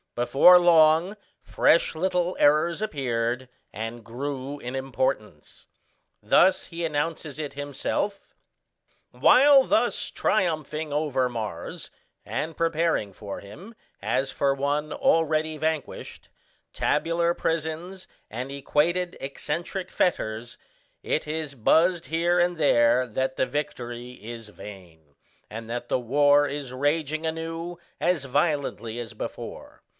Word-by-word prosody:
Before 135 +9 +6
long 165 +2 +5 0.3
fresh 165 - +3
little 180 +1 0
errors 155 +5 +3
appeared, 125 - -2 0.2
and 115 +3 -6
grew 135 +4 -5
in 125 0 -6
importance. 130 - -3 0.5
Thus 190 0 +4
he 170 -1 -6
announces 155 -1 -3
it 150 -2 -4
himself: 145 +8 -3 0.8
"While 275 +1 +6
thus 240 -1 +1
triumphing 155 -5 -1
over 145 -4 0
Mars, 110 -8 -6 0.3
and 160 +1 -4
preparing 165 - 0
for 100 0 -7
him, 155 - -12 0.3
as 135 +1 0
for 140 -1 +1
one 145 +2 -1
already 155 -1 +1
vanquished, 155 -2 -4 0.4
tabular 170 +1 +1
prisons 165 +4 -3 0.2
and 125 +5 -5
equated 165 +6 0
excentric 170 +7 -4
fetters, 115 -9 -1 0.5
it 155 - -1
is 155 -2 -4
buzzed 170 +8 +3
here 170 +2 +1
and 175 0 +1
there 125 -4 +4
that 130 +3 -2
the - - +2
victory 125 -4 -5
is 115 -1 -9
vain, 85 -8 -13 0.3
and 115 +1 -8
that 120 +1 -4
the - - +1
war 145 +4 +4
is 140 -3 -5
raging 155 +3 -1
anew 165 +2 -4 0.2
as 170 -5 +1
violently 135 -5 -1
as 120 -2 -7
before. - - -8
145 Hz, 115 wpm, -25 LUFS, 125-165 Hz, 0.8 s, Before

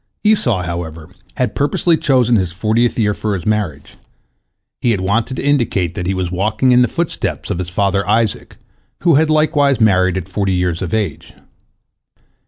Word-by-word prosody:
Esau, 130 - +2
however, 85 -2 -6 0.3
had 125 -4 0
purposely 155 +4 +1
chosen 125 -6 +2
his 95 -5 0
fortieth 110 +6 0
year 105 -3 +1
for 105 0 -2
his 85 - -6
marriage; 100 -10 -2 0.8
he 120 - +1
had 110 -4 +1
wanted 110 +7 0
to - - -4
indicate 120 - +1
that 90 -1 -4
he 95 - 0
was 90 -2 -2
walking 105 +7 +1
in 125 0 +5
the 125 - +4
footsteps 170 -1 -3
of 85 - -2
his 90 -1 -3
father 100 +2 0
Isaac, 110 0 0 0.4
who 170 -2 +3
had 155 +2 +3
likewise 150 -4 +2
married 95 -4 +3
at 90 -1 -5
forty 95 0 -1
years 90 -2 -1
of 90 - -3
age. 105 -8 -3
105 Hz, 175 wpm, -17 LUFS, 90-125 Hz, 0.8 s, in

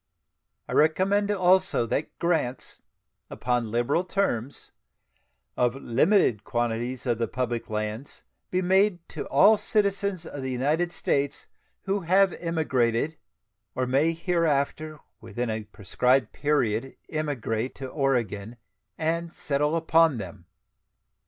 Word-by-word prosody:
I - - -5
recommend 190 +6 +3
also 185 - +3
that 140 +6 -3
grants, 160 -7 -1 0.5
upon 125 -2 -1
liberal 120 +9 +1
terms, 145 - -2 0.8
of 125 0 +1
limited 125 - +2
quantities 120 +2 -2
of 120 -3 0
the 115 - 0
public 120 0 -3
lands 110 +4 -4 0.3
be 185 +1 0
made 190 -1 +2
to - - -6
all 220 +1 +6
citizens 200 -4 0
of 145 - -7
the 130 - -3
United 150 +7 0
States 140 -3 -1 0.4
who 195 +1 0
have 190 +1 +3
emigrated, 150 -4 0 0.6
or 130 - 0
may 140 +6 +2
hereafter 155 -3 -1 0.2
within 120 -1 -4
a 110 -1 -4
prescribed 125 +6 +1
period 135 -4 0
emigrate, 130 -6 -2
to 135 - -6
Oregon 120 -6 -1 0.4
and 165 +1 -1
settle 150 +2 0
upon 165 -3 +3
them. 95 -6 -8
140 Hz, 115 wpm, -26 LUFS, 120-170 Hz, 0.8 s, all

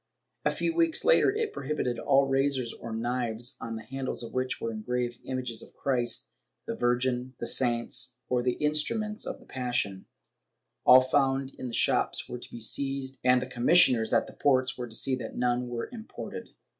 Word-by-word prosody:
A - - +5
few 335 - -1
weeks 330 -1 +2
later - - +5
it 430 +1 -1
prohibited 135 -4 -2
all 135 0 +4
razors 135 -2 0
or 115 - -8
knives 120 +1 -2
on 115 0 -4
the 110 - -7
handles 135 -1 -4
of 115 - -8
which 130 0 -1
were 115 - -3
engraved 120 +2 -3
images 125 -3 -3
of - - -14
Christ, 120 -4 -1 0.4
the - - -3
Virgin, 125 +1 0
the - - -3
saints 120 0 +2
or 125 -1 +1
the 125 0 0
instru 150 +7 0
ments 215 -1 -4
of - - -5
the - - -18
Passion; 120 -7 -2 0.8
all 130 +1 +10
found 135 0 +1
in 130 - -6
the 120 - -7
shops - - +1
were 125 - -6
to - - -12
be 120 - -7
seized, 135 +3 -2
and 125 0 +4
the - - -4
commissioners 125 -2 +4
at 115 - +3
the - - -12
ports 130 -2 +2
were 125 -1 -5
to 110 - -8
see 130 - +1
that 115 -3 -7
none 125 0 +1
were 120 -1 -4
imported. 225 -2 -8
125 Hz, 190 wpm, -28 LUFS, 120-135 Hz, 0.8 s, all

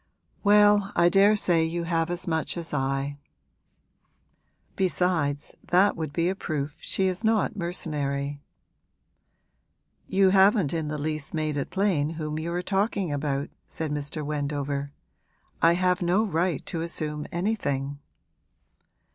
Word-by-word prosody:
'Well, 205 -1 +5
I 170 0 +5
daresay 195 -3 +4
you 170 +1 -2
have 165 -1 0
as 175 +1 -3
much 160 +1 -1
as 165 -2 -6
I. 135 +1 -1 1.6
Besides, 165 -5 0
that 185 +3 +3
would 160 -3 -4
be 170 +3 0
a 185 - +1
proof 150 -6 -4
she 190 - 0
is 185 +3 -1
not 220 0 +2
mercenary.' 145 -6 -2 1.7
'You 190 0 +4
haven't 195 - +4
in 160 -2 -2
the 150 0 -3
least 155 0 -4
made 155 -1 -1
it 140 - -2
plain 185 -7 +1
whom 155 -1 -3
you 165 +2 -3
are 175 +1 -2
talking 195 -2 0
about,' 140 -1 -2 0.2
said 160 -2 -4
Mr. 150 +1 -3
Wendover. 145 -1 -2 0.7
'I 165 +1 +6
have 180 +1 +1
no 180 +5 +2
right 175 -5 -1
to 165 - -3
assume 150 -3 -3
anything.' 145 -8 -2
165 Hz, 130 wpm, -26 LUFS, 145-185 Hz, 1.7 s, I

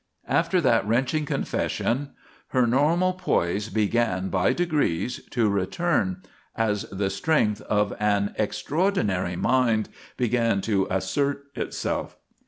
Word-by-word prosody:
After 185 - +2
that 115 - +2
wrenching 130 +7 +1
confession 135 +2 -1 0.3
her 125 -1 +2
normal 160 +9 +2
poise 105 - 0
began 105 -3 0
by 95 -1 +2
degrees 145 - 0
to 115 -3 +1
return 175 - 0 0.3
as 105 -3 0
the 95 0 -1
strength 105 -3 +1
of 105 -1 +1
an 100 -1 +1
extraordinary 105 - 0
mind 115 0 +2 0.3
began 115 -3 +1
to 95 -2 +1
assert 140 +10 -1
itself. - - -3
115 Hz, 110 wpm, -25 LUFS, 100-145 Hz, 0.3 s, After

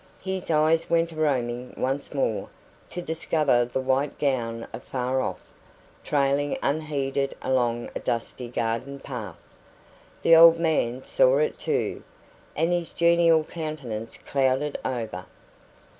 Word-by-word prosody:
His 190 -2 -4
eyes 160 +1 +3
went 170 0 +2
a - - -11
roaming 125 -5 -1
once 135 +2 -2
more, 135 -6 -1 0.4
to 175 - -5
discover 155 -6 +1
the 125 +2 -3
white 130 +2 0
gown 115 -5 -1
afar 130 0 -2
off, - - -4 0.6
trailing 140 0 +1
unheeded 140 -2 -1
along 120 -2 0
a - - -2
dusty 120 +1 -3
garden 120 +3 -2
path. 110 -11 -7 0.9
The 165 - +7
old 165 0 +9
man 150 -7 0
saw - - +3
it 470 -1 0
too, - - -1 0.5
and 165 +2 +1
his 175 -1 -1
genial 170 -1 +4
countenance 145 -10 -6
clouded 135 +1 0
over. 110 -8 -4
140 Hz, 125 wpm, -25 LUFS, 125-160 Hz, 0.9 s, old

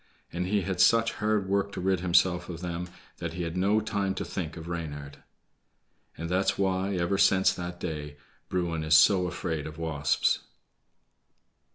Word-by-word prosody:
And 90 +1 -2
he 100 +1 +1
had 95 0 -1
such 115 0 +4
hard 105 -2 +1
work 100 +1 0
to - - -5
rid 95 0 +1
himself 90 0 +2
of 85 -1 -6
them 90 0 -4 0.3
that 85 -1 -5
he 90 0 -3
had 85 0 -4
no 100 +4 +3
time 100 -3 -1
to - - -3
think 85 -3 -5
of 80 0 -8
Reynard. 75 -4 -6 1.0
And 85 - -4
that's 95 +3 +1
why, 95 0 0
ever 90 +2 0
since 95 -1 +4
that 90 0 -6
day, 75 -3 -5 0.3
Bruin 85 -3 -1
is 80 -1 +4
so 90 +3 +6
afraid 80 -4 -3
of 75 0 -9
wasps. 80 -3 +1
90 Hz, 170 wpm, -28 LUFS, 80-95 Hz, 1.0 s, so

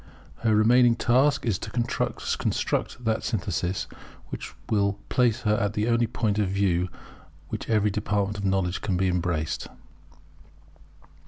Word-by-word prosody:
Her 110 -2 +2
remaining 120 +2 +5
task 135 +4 +2
is 110 -6 0
to - - -6
construct 120 0 -1
that 110 0 0
synthesis 95 - -1 0.4
which - - -7
will 100 -2 +2 0.2
place 120 -3 +2
her 105 - +2
at 105 -2 0
the 105 +1 0
only 120 0 +2
point 110 -2 -1
of 100 -3 +1
view 95 -2 +1
from 85 - -19 0.5
which - - -5
every 105 -2 +3
department 105 0 -1
of - - -5
knowledge 95 -2 0
can 95 -4 -1
be 95 +1 +2
embraced. 85 -4 -1
105 Hz, 145 wpm, -26 LUFS, 95-115 Hz, 0.5 s, remaining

